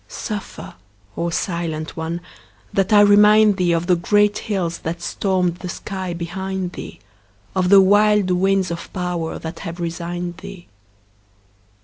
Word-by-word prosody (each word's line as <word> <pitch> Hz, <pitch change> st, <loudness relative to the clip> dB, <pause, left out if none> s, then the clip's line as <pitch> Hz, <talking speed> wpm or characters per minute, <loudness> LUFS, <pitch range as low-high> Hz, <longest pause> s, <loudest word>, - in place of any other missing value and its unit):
Suffer, 210 Hz, -3 st, -6 dB, 0.4 s
O 170 Hz, -, -1 dB
silent 165 Hz, -2 st, -3 dB
one, 165 Hz, +1 st, -4 dB, 0.5 s
that 195 Hz, 0 st, +1 dB
I 205 Hz, -1 st, +7 dB
remind 210 Hz, 0 st, +6 dB
thee 180 Hz, -2 st, +1 dB
Of 165 Hz, 0 st, 0 dB
the 180 Hz, 0 st, +3 dB
great 205 Hz, +4 st, +2 dB
hills 175 Hz, -5 st, -1 dB
that 165 Hz, +1 st, -4 dB
stormed 180 Hz, -1 st, -1 dB
the 180 Hz, -, -7 dB
sky 190 Hz, 0 st, -5 dB
behind 185 Hz, +2 st, -4 dB
thee, -, -, -9 dB, 0.6 s
Of 185 Hz, -1 st, +1 dB
the 200 Hz, 0 st, +8 dB
wild 205 Hz, 0 st, +4 dB
winds 190 Hz, 0 st, +1 dB
of 170 Hz, -, -6 dB
power 180 Hz, -3 st, -3 dB
that 165 Hz, +1 st, -7 dB
have 170 Hz, +1 st, -7 dB
resigned 175 Hz, +1 st, -4 dB
thee. 195 Hz, -2 st, -10 dB
180 Hz, 140 wpm, -20 LUFS, 170-195 Hz, 0.6 s, the